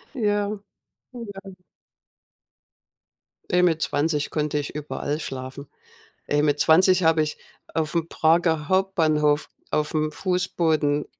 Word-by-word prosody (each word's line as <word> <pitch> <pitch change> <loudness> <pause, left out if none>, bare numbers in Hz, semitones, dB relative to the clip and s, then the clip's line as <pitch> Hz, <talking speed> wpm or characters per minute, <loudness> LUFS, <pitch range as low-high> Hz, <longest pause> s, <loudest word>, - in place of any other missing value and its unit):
Ja. 205 -4 +1 0.6
Oh 240 -2 -8 0.2
ja. 190 -1 -10 2.0
Ne, 180 0 +4
mit 165 -3 +2
20 150 +1 0
konnte 150 -1 -1
ich 145 - -5
überall 150 0 -3
schlafen. 130 -1 -7 0.6
Ey, 145 0 +1
mit 145 -1 +1
20 185 +3 +5
habe 160 -1 +4
ich 150 0 -2 0.4
aufm 160 +1 -1
Prager 160 -1 +2
Hauptbahnhof 155 -6 +2 0.2
aufm 155 0 0
Fußboden 160 -4 0
155 Hz, 105 wpm, -24 LUFS, 150-180 Hz, 2.0 s, 20